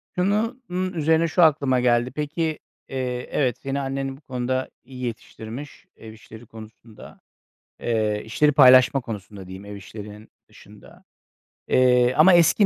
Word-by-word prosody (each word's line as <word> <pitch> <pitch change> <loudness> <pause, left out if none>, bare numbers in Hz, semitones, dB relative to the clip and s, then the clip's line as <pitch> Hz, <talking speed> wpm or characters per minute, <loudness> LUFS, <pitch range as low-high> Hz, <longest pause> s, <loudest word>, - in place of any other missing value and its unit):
Şunu 210 +7 0
n 180 - -6 0.2
üzerine 160 +2 +2
şu 175 +2 +2
aklıma 140 -5 +3
geldi. 120 0 +1
Peki, 155 +2 -3 0.3
eee, 125 -2 -4
evet, 130 -5 0
seni 135 0 -4
annen 135 0 -4
bu - - -22
konuda 130 -1 -3
iyi 130 0 -10
yetiştirmiş 120 +3 -8
ev 110 -1 -12
işleri 110 +1 -14
konusunda, 110 0 -14 0.6
eee, 110 -2 -1
işleri 150 +7 +2
paylaşma 130 -1 +6
konusunda 100 -4 -9
diyeyim, 95 +2 -10
ev 100 0 -8
işlerinin 105 +2 -11 0.2
dışında. - - -17 0.6
Eee, 125 -1 +3
ama 165 +5 +7
eski 175 +4 +5
130 Hz, 140 wpm, -23 LUFS, 110-150 Hz, 0.6 s, ama